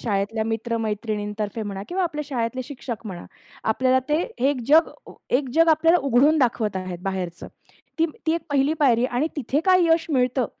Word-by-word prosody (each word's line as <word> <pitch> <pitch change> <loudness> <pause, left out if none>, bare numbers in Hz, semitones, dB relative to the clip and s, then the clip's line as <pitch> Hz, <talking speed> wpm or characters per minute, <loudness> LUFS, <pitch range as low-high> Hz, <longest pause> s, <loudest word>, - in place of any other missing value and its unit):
शाळेतल्या 215 0 -1
मित्र-मैत्रिणीतर्फे 220 -1 -3
म्हणा 200 -2 -5
किंवा 375 +1 -1
आपल्या 300 -3 -3
शाळेतले 255 -1 -2
शिक्षक 245 -5 -7
म्हणा, 180 -3 -7 0.4
आपल्याला 255 +3 +2
ते 300 +2 +2 0.3
एक 280 -3 -1
जग 315 +3 +5 0.4
एक 265 +1 +1
जग 330 +1 +5
अ, - - +7
आपल्याला 330 +3 +3
उघडून 280 +5 +4
दाखवत 225 -6 +1
आहेत 185 -1 -5
बाहेरच. 185 -3 -4 0.6
ती 330 - +3 0.2
ती 320 - +3
एक 335 - -1
पहिली 280 +1 +2
पायरी 245 -3 +4
आणि 255 +4 -1
तिथे 285 +1 0
काय 370 -2 +5
यश 325 0 +2
मिळतं 250 -2 +1
250 Hz, 170 wpm, -23 LUFS, 215-300 Hz, 0.6 s, अ